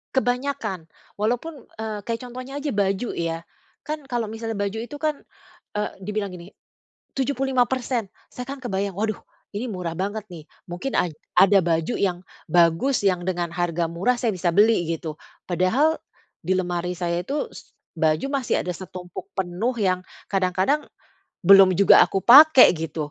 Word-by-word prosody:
Kebanyakan. 245 - -1 0.3
Walaupun 245 +7 -3
e 220 - -3 0.2
kayak 230 0 -3
contohnya 255 +3 -7
aja 295 - -4
baju 200 +3 0
ya. 165 0 -3 0.4
Kan 305 -1 -4
kalo 240 -2 -1
misalnya 225 -1 -5
baju 205 +2 -2
itu 265 +5 -8
kan, 305 -2 -2 0.5
e 210 - -2 0.2
dibilang 210 0 -3
gini, 175 +2 -12 0.6
75%. 260 -4 0 0.2
Saya 250 - -6
kan 280 - -5
kebayang, 200 -6 -3
waduh, 215 0 -1 0.4
ini 235 +5 -3
murah 180 -5 -4
banget 200 +4 -3
nih. 160 -3 -9 0.2
Mungkin 180 +10 -4
aj 175 -3 +1 0.2
ada 195 0 +7
baju 165 +4 0
yang 185 -3 +1 0.3
bagus, 175 - +3
yang 180 -2 +2
dengan 175 -2 -3
harga 175 -1 -1
murah 180 +10 0
saya 230 -4 0
bisa 180 -1 -1
beli, 205 -1 +3
gitu. 160 -1 -6 0.3
Padahal 225 - +2 0.4
di 185 +2 +1
lemari 180 -1 -2
saya 170 0 -1
itu, 285 +9 -2
s - - -13 0.2
baju 160 +1 +1 0.2
masih 245 - 0
ada 180 - -2
setumpuk 180 - -9
penuh 190 +7 -1
yang 185 -4 +1 0.3
kadang-kadang, 195 +9 +1 0.6
belum 195 -1 +8
juga 200 - +7
aku 195 - -2
pake 280 +2 +9
gitu. 160 -2 -4
200 Hz, 150 wpm, -23 LUFS, 175-245 Hz, 0.6 s, pake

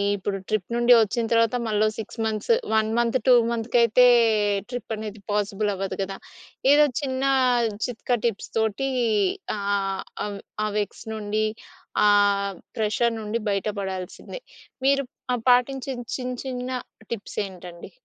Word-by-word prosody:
ఇప్పుడు 200 0 -3
ట్రిప్ 215 0 -2
నుండి 240 +1 +5
వచ్చిన 225 +2 0
తర్వాత 230 +1 +3
మళ్ళో 215 0 +2
6 220 +1 -7
మంత్స్, 220 - +1 0.2
1 220 0 +3
మంత్, 235 +1 +2
2 255 - +8 0.2
మంత్స్‌‌కి 235 +1 0
అయితే 235 +2 +5 0.6
ట్రిప్ 245 -3 -5
అనేది 215 -1 -7
పాసిబుల్ 205 0 0
అవ్వదు 195 0 -3
గదా! 195 0 -4 0.5
ఏదో 295 +1 +7 0.2
చిన్న 260 -1 -2 0.6
చిట్కా 245 0 -1
టిప్స్‌తోటి 225 +3 -1 0.7
ఆహ్, 200 - -4 0.6
ఆహ్, - - -2
ఆహ్, - - -2
ఆవ్ 200 - -7 0.3
ఆ - - 0
వెక్స్ 205 +2 -5
నుండి 215 0 -1 0.6
ఆహ్, 200 -1 +3 0.2
ప్రెషర్ 225 +2 +1
నుండి 215 +1 -2
బయట 200 +1 -1
పడాల్సిందే. 190 - -6 0.4
మీరు 275 0 +3 0.3
ఆహ్, 240 -2 -3
పాటించిన 255 +1 +2 0.2
చిన్, 250 -1 -4
చిన్న 250 -1 -4 0.4
టిప్స్ 225 -3 -6
ఏంటండి? 175 -2 -11
220 Hz, 135 wpm, -24 LUFS, 205-245 Hz, 0.7 s, 2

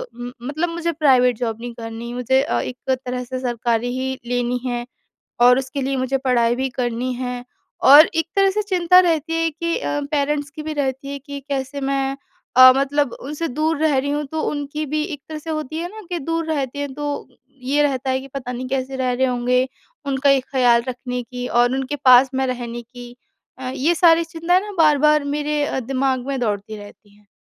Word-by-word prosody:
उम, 245 0 -7 0.2
मतलब 310 +5 -1
मुझे 340 0 -2
private 255 -6 +3
job 225 -2 -3
नहीं 240 -1 -6
करनी, 230 0 -7
मुझे 250 +2 +2
अ, - - -1
एक 250 - -5 0.3
तरह 250 0 -3
से 255 +1 -5
सरकारी 240 -1 -1
ही 265 0 -2 0.2
लेनी 245 0 0
है 240 -1 -2 0.6
और 250 +1 +6
उसके 270 +1 -4
लिए 270 +1 -1
मुझे 260 +1 0
पढ़ाई 240 -3 +2
भी 265 +1 -1
करनी 245 0 -2
है। 250 0 -5 0.4
और 295 +4 +10
एक 325 -1 +1
तरह 390 0 +4
से 425 +2 -1
चिंता 365 -3 +4
रहती 325 -3 0
है 330 - +1
कि 335 +2 -2
अ, 290 - -2
पेरेंट्स 290 -1 0
की 305 +1 -8
भी 310 0 -4
रहती 275 -1 -2
है 280 - -5
कि 280 0 -8
कैसे 275 0 -3
मैं 270 0 -1 0.4
अ, 255 0 +10
मतलब 280 -1 +1
उनसे 300 +5 -4
दूर 310 +5 0
रह 305 -3 +3
रही 280 +2 -1
हूँ 295 +1 -1
तो 315 - -1
उनकी 290 +1 -4
भी 300 +2 -1
एक 305 -5 -6
तरह 310 - -5
से 320 +2 -7
होती 310 0 -4
है 345 - -3
ना 435 +4 -10
कि 350 - -1
दूर 330 +2 -2
रहते 280 -2 -3
हैं 285 -2 -3
तो 290 0 -4 0.3
ये 280 +3 +1
रहते 265 -2 0
हैं 260 0 0
कि 270 - -11
पता 250 -2 -4
नहीं 255 +1 -5
कैसे 265 0 -2
रह 255 -1 0
रहे 260 +2 +1
होंगे। 250 +1 +1 0.4
उनका 275 +1 +2
ये 275 -1 +4
ख़्याल 245 -3 +2
रखने 250 0 -4
की 245 +1 -6
और 240 +1 +3
उनके 270 +2 -2
पास 255 +1 +7
में 265 0 +1
रहने 240 -2 -4
की 245 +1 -12 0.4
अ, 255 -1 -4
ये 320 +6 +1
सारी 335 -1 +5
चिंताएँ 335 +2 +1
ना 415 +1 -7
बार-बार 300 -1 +4
मेरे 295 +1 -1
अ, 265 - -2
दिमाग 260 0 -1
में 275 -1 -2
दौड़ती 215 -1 -2
रहती 205 0 -14
हैं। 210 -1 -26
270 Hz, 210 wpm, -21 LUFS, 250-300 Hz, 0.6 s, और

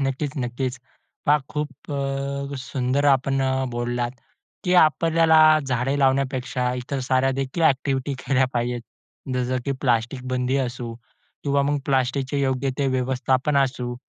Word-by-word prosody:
नक्कीच, 135 +1 -1
नक्कीच. 125 +1 -3 0.5
पहा, 150 +1 +5
खूप 150 0 -2 0.2
अ, 140 0 -3
सुंदर 130 +1 -1
आपण 135 0 +3
अ, 130 0 0
बोललात, 120 0 -2 0.5
की 180 - +1
आपल्याला 160 +1 +4 0.3
झाडे 130 +2 0
लावण्यापेक्षा 130 -2 +1
इतर 125 +2 -4
साऱ्यादेखील 135 +4 0
ॲक्टिव्हिटी 135 -2 +1
केल्या 130 0 +2
पाहिजेत. 120 0 -1 0.5
जसं 125 0 0
की 140 - 0
प्लास्टिक 120 0 0
बंदी 130 +1 0
असो 120 -2 -3 0.5
किंवा 140 -1 +2
मग 145 +1 +1
प्लास्टिकचे 135 +1 0
योग्य 135 0 0
ते 140 - +1
व्यवस्थापन 130 +2 0
असू. 125 -3 0
135 Hz, 130 wpm, -23 LUFS, 125-140 Hz, 0.5 s, पहा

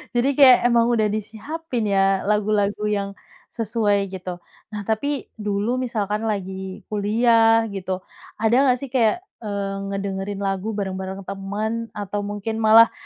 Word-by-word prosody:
Jadi 245 +3 +3
kayak 260 -3 +9
emang 235 -1 +4
udah 215 -2 +2
disiapin 225 +5 -4
ya 195 -1 +3
lagu-lagu 210 0 +1
yang, 200 -1 -1 0.4
sesuai 205 -3 0
gitu 185 -1 -5 0.3
nah 210 -1 -6
tapi 260 +6 -2
dulu 210 +4 -1
misalkan 220 -3 -2
lagi 190 -1 -4
kuliah 225 +2 +4
gitu, 190 -1 -4 0.3
ada 220 +2 +2
nggak 250 0 +4
sih 270 - -5
kayak, 255 - +2 0.2
eee, 200 -2 -3
ngedengerin 195 0 -3
lagu 195 +2 -2
bareng-bareng 190 -1 -4
temen 210 +4 -3
atau 205 0 -3
mungkin 205 +2 -4
malah, 225 +1 +7
210 Hz, 135 wpm, -22 LUFS, 195-225 Hz, 0.4 s, kayak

